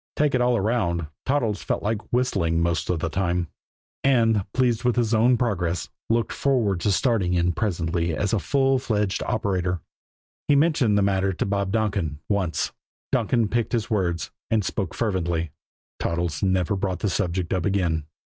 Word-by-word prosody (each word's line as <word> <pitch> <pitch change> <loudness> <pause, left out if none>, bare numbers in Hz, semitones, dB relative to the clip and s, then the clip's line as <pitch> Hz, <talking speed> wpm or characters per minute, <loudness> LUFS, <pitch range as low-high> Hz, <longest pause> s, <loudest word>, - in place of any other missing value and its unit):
Take 150 -1 +2
it 125 - +2
all 125 -1 +3
around, 95 -6 0 0.2
Toddles 120 -7 +1
felt - - -2
like 105 0 -2
whistling 95 -10 +1
most 85 -2 0
of 85 -3 0
the 85 - 0
time; 85 -1 -1 0.5
and, 115 -6 +3
pleased 125 -3 +1
with 125 -1 +2
his 120 -2 +1
own 120 +3 +4
progress, 90 -8 -1 0.2
looked 115 0 +1
forward 115 -9 +1
to 100 +4 +1
starting 95 -4 +2
in 90 0 +2
presently 85 -3 -1
as 100 +1 0
a 110 - +3
full 135 +1 +2
fledged 105 -5 -1
operator. 90 -4 -1 0.7
He 145 - +5
mentioned 140 -8 +3
the 100 - +3
matter 95 -1 +1
to 85 - -2
Bob 100 -1 -1
Donkin 100 -8 0
once. 95 -5 0 0.4
Donkin 115 -2 +2
picked 120 +3 -1
his 115 -1 -1
words 85 -6 0 0.2
and 110 -3 +1
spoke 95 -6 -3
fervently. 85 -7 -1 0.5
Toddles 85 -3 -1
never 95 -1 +1
brought 95 -2 -2
the - - +1
subject 90 -2 -1
up 90 -3 0
again. 85 -6 0
100 Hz, 165 wpm, -24 LUFS, 85-115 Hz, 0.7 s, He